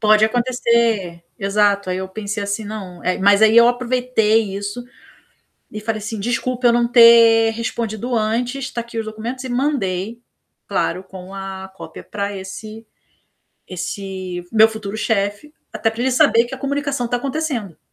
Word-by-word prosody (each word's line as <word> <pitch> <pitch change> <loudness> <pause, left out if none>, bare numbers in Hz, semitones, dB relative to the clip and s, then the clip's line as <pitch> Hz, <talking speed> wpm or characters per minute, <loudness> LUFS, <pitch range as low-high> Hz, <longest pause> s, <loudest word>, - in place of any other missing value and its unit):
Pode 215 0 +5
acontecer, 235 -7 0
exato, 200 -2 +1
aí 180 - -1
eu 190 0 -4
pensei 205 +1 -5
assim: 205 +2 -3
"Não", 195 -4 -8
eh, 185 - 0
mas 200 +2 +4
aí 220 +1 +6
eu 235 - +8
aproveitei 240 -4 +1
isso, 205 +5 -5 0.9
e 215 - -6
falei 215 0 -3
assim: 215 0 -5
"Desculpa, 245 +3 0
eu 235 - +5
não 240 0 +3
ter 230 -1 +7
respondido 230 +1 -3
antes, 245 +4 -1
tá 235 - -4
aqui 235 0 -9
os 220 - -3
documentos.", 230 +4 -6
e - - -5
mandei, 235 -5 -1 0.5
claro, 185 - -1
com 190 0 -11
a 195 -1 -7
cópia - - -10
pra 200 0 -4
esse 215 +4 -8 0.8
esse 185 0 -5
meu 220 0 +6
futuro 220 -2 -6
chefe, 205 +6 -1 0.2
até 225 - +1
para 225 +1 -9
ele 260 - +1
saber 230 -1 +4
que 245 - -9
a - - -5
comunicação 280 -2 -2
está 245 - 0
acontecendo. 265 - -3
220 Hz, 160 wpm, -20 LUFS, 200-240 Hz, 0.9 s, eu